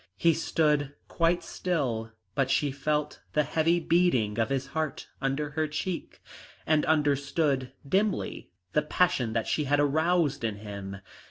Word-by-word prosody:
He 165 -1 +4
stood 150 -3 +1
quite 170 +1 +1
still, 130 -12 -2 0.2
but 135 +3 +1
she 140 +1 +2
felt 150 +2 -1
the 150 - +3
heavy 165 +4 +2
beating 130 -12 +2
of 115 - +1
his 135 -1 -1
heart 155 +2 -3
under 140 +2 -1
her 155 +1 0
cheek, 165 +4 -4 0.4
and 155 -1 +2
understood 145 -2 +1 0.2
dimly 195 +5 0 0.2
the 150 - +4
passion 150 -6 +1
that 115 -1 0
she 150 - 0
had 145 +1 +2
aroused 155 0 +2
in 110 -2 -1
him. 100 -2 -7
150 Hz, 145 wpm, -28 LUFS, 135-160 Hz, 0.4 s, He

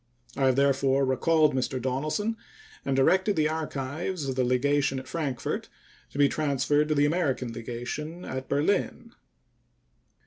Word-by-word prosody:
I 135 -1 +2
have 130 - +3
therefore 135 0 +3
recalled 150 +4 +3
Mr. 130 0 -1
Donelson 155 - -1 0.5
and 135 - 0
directed 190 +9 +3
the 155 -1 +2
archives 155 +1 -3
of 135 - -1
the 130 - +2
legation 135 +2 +1
at 130 0 -7
Frankfort 145 -7 -3 0.4
to - - -10
be 145 0 +5
transferred 145 0 +1
to 155 - +1
the 145 0 +4
American 140 -7 0
legation 125 +9 -6
at 130 0 -5
Berlin. 200 +10 0
140 Hz, 140 wpm, -27 LUFS, 130-155 Hz, 0.5 s, be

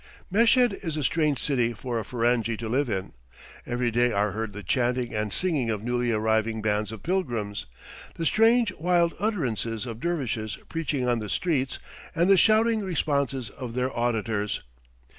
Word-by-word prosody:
Meshed 235 +3 +4
is 160 -3 -3
a 150 - -1
strange 150 0 +2
city 120 -3 0
for 120 +1 -3
a - - -3
Ferenghi 115 0 0
to 115 - -5
live 130 +3 0
in; 95 -3 -3 0.5
every 120 0 0
day 120 +1 +3
are 100 0 +1
heard 110 +2 -3
the 105 0 -8
chanting 125 +4 0
and 105 -1 -1
singing 150 - 0
of 105 -2 -2
newly 120 0 0
arriving 110 0 +1
bands 105 -1 0
of 110 - -9
pilgrims, 115 - -2 0.5
the 165 - -3
strange, 225 +1 +4
wild 170 0 +2
utterances 120 - -1
of 115 -2 -6
dervishes 125 -10 -2
preaching 150 -6 -1
on 120 -1 +2
the 105 -2 -5
streets, 135 - 0 0.4
and 170 +4 +3
the - - +8
shouting 220 +3 +4
responses 140 - -1
of 120 -3 -7
their 125 +1 -1
auditors. 110 -3 -1
120 Hz, 165 wpm, -26 LUFS, 110-165 Hz, 0.5 s, the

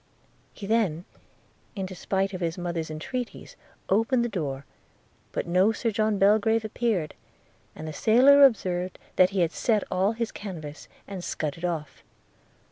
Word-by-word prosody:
He 205 - -9
then, 195 -6 0 0.7
in 195 -2 -3
despite 190 +1 -2
of 185 - -5
his 165 0 -2
mother's 170 -3 -3
entreaties, 240 +11 -6 0.3
opened 230 +5 +2
the - - -2
door; 140 - -4 0.7
but - - -2
no 185 +5 +3
Sir 225 +1 -1
John 215 0 +1
Belgrave 215 +3 +3
appeared, 215 -7 -1 0.6
and 155 - -7
the 155 - -5
sailor 260 - +6
observed 185 -8 +2 0.2
that 185 0 +6
he 195 -1 0
had 170 -1 +2
set 215 0 +1
all 190 +4 +2
his 230 0 -3
canvas, 160 -7 -8 0.2
and 195 -3 -6
scudded 155 +2 -3
off. 155 -6 -4
195 Hz, 145 wpm, -26 LUFS, 170-220 Hz, 0.7 s, sailor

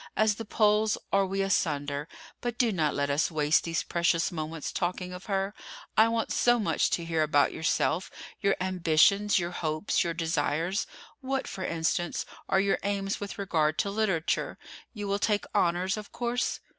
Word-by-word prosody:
As 215 -1 +4
the 225 +2 -7
poles 210 0 +2 0.2
are 195 -1 +3
we 195 +1 -1
asunder. 145 -6 0 0.3
But 240 -1 -3
do 240 -3 +3
not 155 -6 0
let 140 0 0
us 145 +3 +2
waste 155 -1 +2
these 165 -1 -1
precious 170 0 +1
moments 160 -2 -4
talking 180 +1 -2
of 180 +1 -9
her. 195 0 -1 0.4
I 220 - +6
want 230 0 -1
so 240 0 +4
much 215 - +1
to 170 - -1
hear 165 -1 0
about 145 -2 +3
yourself—your 180 +4 -1
ambitions, 185 +3 +3
your 175 -1 -1
hopes, 155 +2 0
your 170 -2 -2
desires. 165 +3 0 0.3
What, 270 -1 -2
for 190 - -5
instance, 170 0 -1 0.2
are 190 - +3
your 195 0 +2
aims 195 -1 -2
with 205 -1 -6
regard 160 -6 +1
to 200 - 0
literature? 195 -6 0 0.3
You 205 -3 -5
will 200 +1 0
take 205 -1 +1
honors, 180 +3 +1
of 210 -1 -8
course?" 245 +1 -1
185 Hz, 170 wpm, -28 LUFS, 165-205 Hz, 0.4 s, I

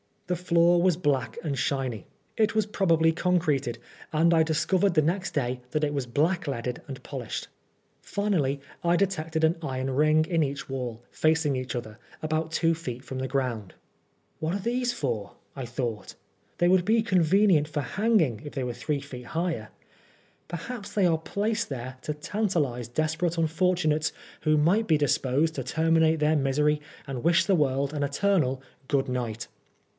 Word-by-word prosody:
The 180 - -1
floor 170 0 +4
was 180 -2 +4
black 140 -9 0
and 140 -5 -2
shiny. 130 -7 -2 0.3
It 220 0 +2
was 215 -2 +3
probably 165 -6 +3
concreted, 160 -8 0 0.4
and 165 +2 +4
I 160 -1 +5
discovered 175 +4 +2
the 155 - +4
next 180 +5 -1
day 125 -3 -1
that 155 - 0
it 145 -1 +1
was 140 -4 -2
blackleaded 140 -4 -1
and 135 -2 -8
polished. 130 -6 -5 0.5
Finally 165 -10 0 0.2
I 170 0 +3
detected 165 -4 0
an 160 +2 +3
iron 130 -3 -2
ring 155 +3 +3
in 165 -1 +1
each 140 -2 -2
wall, 125 -3 -4
facing 155 -3 +2
each 130 0 -4
other, 110 -2 -6 0.2
about 155 +1 -1
two 165 0 +2
feet 130 -7 -6
from 130 0 -6
the 130 - -2
ground. 125 -7 -2 0.3
" - - -43
What 160 +4 -1
are - - -2
these 245 +4 0
for 115 - -3
?" - - -40
I 135 -3 -5
thought. 120 -4 -4 0.2
" - - -40
They 175 - +4
would 185 -1 +4
be 220 +1 +3
convenient 185 -4 +4
for 150 -1 -2
hanging 165 - +1
if 145 - -7
they 135 - -2
were 125 -1 -3
three 140 +4 -2
feet 130 -3 -9
higher. 165 -11 -1 0.8
Perhaps 200 +5 -6
they 200 -3 +3
are 165 -2 +3
placed 210 +7 -1
there 130 -1 -6
to 150 - -2
tantalise 150 - -1
desperate 155 +6 -1
unfortunates 160 -2 +1 0.3
who 155 0 +3
might 185 +9 +3
be 160 - +4
disposed 145 +1 +1
to - - -3
terminate 160 0 +2
their 155 +1 +3
misery 150 +2 +2 0.2
and 135 -3 -5
wish 170 +2 +4
the 195 - +2
world 140 -3 +1
an 150 - -2
eternal 140 -3 +1 0.2
"Good 135 -2 +1
Night!" 120 -2 -3
155 Hz, 170 wpm, -27 LUFS, 135-175 Hz, 0.8 s, I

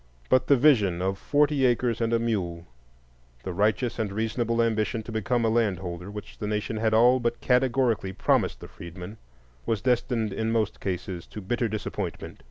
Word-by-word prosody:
But 130 - +3
the 140 - +5
vision 110 - +4
of 95 +1 -1
"forty 145 -1 +2
acres 120 -2 +2
and 115 0 +1
a 115 - +3
mule"—the 60 - -6
righteous 110 +5 0
and 105 -3 -1
reasonable 115 +2 -1
ambition 110 -1 0
to 115 - -8
become 115 +2 0
a - - +3
landholder, 95 -5 -1
which 105 0 -9
the 105 - -3
nation 105 +1 -2
had 110 0 +1
all 125 +3 +5
but 120 -1 -1
categorically 125 -5 +1
promised - - +1
the - - -8
freedmen—was 85 - -8
destined 120 -4 0
in 110 +3 -1
most 110 -2 0
cases 90 -2 -4
to - - -8
bitter 120 +4 -1
disappointment. 110 0 -5
110 Hz, 165 wpm, -26 LUFS, 95-120 Hz, -, the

